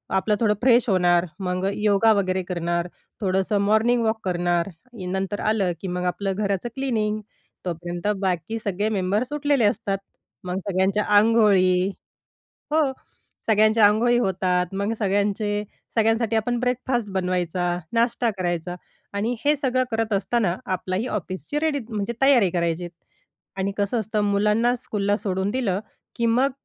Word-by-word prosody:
आपलं 210 +2 +2
थोडं 215 -2 +3
फ्रेश 245 -1 +4
होणार, 175 -2 +3
मग 185 0 -2
अ, - - +2
योगा 210 +1 +3
वगैरे 185 -2 0
करणार, 170 -1 -2 0.3
थोडंसं 190 +1 +1
मॉर्निंग 220 +4 +3
वॉक 220 0 0
करणार. 175 0 0 0.3
इ 185 - -6
नंतर 190 +2 -2
आलं 210 -4 +1
की 190 - -4
मग 180 0 -3
आपलं 195 +2 -1
घराचं 200 +1 -1
क्लिनिंग. 215 -6 -1 0.4
तोपर्यंत 175 +2 -4
बाकी 185 +3 -1
सगळे 205 +2 0
मेंबर्स 210 +5 0
उठलेले 285 -5 +2
असतात. 205 -1 0 0.5
मग 180 +1 -3
सगळ्यांच्या 195 +2 +1
अंघोळी 200 -5 +4 0.9
हो, 315 0 +4 0.7
सगळ्यांचे 215 +1 +4
अंघोळी 230 +4 +5
होतात. 185 -4 +1
मग 200 +3 -1
सगळ्यांचे 205 +1 0 0.3
सगळ्यांसाठी 225 0 +2
आपण 240 +2 0
ब्रेकफास्ट 250 -2 -1
बनवायचा, 180 -1 -1
नाश्ता 235 0 +1
करायचा 175 -1 -2 0.4
आणि 220 +5 -1
हे 295 +1 +4
सगळं 255 -2 +1
करत 225 -1 -1
असताना 200 -2 0 0.2
आपलाही 185 +5 -2
ऑफिसची 195 - -3
रेडी 315 -3 +1
म्हणजे 215 0 -2
तयारी 255 -9 +5
करायचीत. 170 0 -1 0.7
आणि 195 +1 -1
कसं 205 +3 0
असतं 215 0 -1
मुलांना 210 +4 +2
स्कूलला 205 -4 -1
सोडून 190 0 -1
दिलं 205 -6 -1 0.4
की 235 - +1
मग 250 +4 +3
205 Hz, 140 wpm, -23 LUFS, 185-230 Hz, 0.9 s, अंघोळी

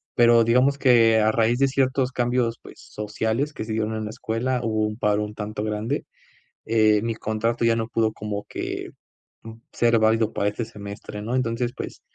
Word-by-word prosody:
Pero, 120 -1 +6
digamos 130 +4 +3
que 115 -4 +5
a 110 0 +3
raíz 115 +2 +2
de 135 - +4
ciertos 130 -1 +1
cambios, 120 -2 0
pues, - - -13
sociales 110 +6 -3
que 110 - -5
se 110 - -4
dieron 110 0 -1
en 110 - -3
la 105 - -5
escuela 125 +2 -2
hubo 110 -1 0
un 105 - -6
paro 105 -2 +1
un 105 - -8
tanto 105 0 -5
grande. 105 +1 -2 0.6
Eh, 110 -2 +3
mi 115 0 -1
contrato 115 +2 -1
ya 115 - +3
no 115 0 -2
pudo 110 -2 +1
como 105 -1 -5
que, - - -5 0.5
uh, 115 0 -9 0.2
ser 115 -1 +3
válido 110 0 +2
para 100 - +1
este 110 +2 -4
semestre, 105 -1 -8
¿no?, 115 +4 -4
entonces, 120 -1 -1
pues, - - -7
115 Hz, 195 wpm, -24 LUFS, 110-120 Hz, 0.6 s, Pero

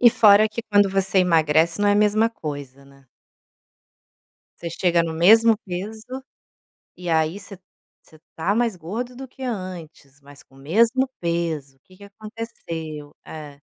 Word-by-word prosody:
E 245 - +8
fora 215 -1 +6
que 220 +2 -6
quando 205 -2 +3
você 195 0 +1
emagrece 165 -1 +3
não 205 - +3
é - - +4
a - - +2
mesma 210 +2 +3
coisa, 145 - -7
né? 140 -1 -21 1.5
Você 170 - -5
chega 170 0 +1
no 165 -1 -3
mesmo 220 +7 +6
peso 220 +8 -6 0.7
e 180 -1 -7
aí 160 +2 +1
você 200 -1 -11 0.4
você 155 - -21 0.2
tá 180 +5 0
mais 230 -3 0
gordo 225 +9 -6
do 265 +1 -8
que 265 +1 -14
antes, 180 - -7
mas 145 0 -15
com - - -22
o - - -17
mesmo 230 - +2
peso, 165 -5 -2
o - - -37
que 185 +7 -21
que 200 - -14
aconteceu? 195 -8 -8
É. 150 -3 -10
185 Hz, 160 wpm, -22 LUFS, 160-215 Hz, 1.5 s, E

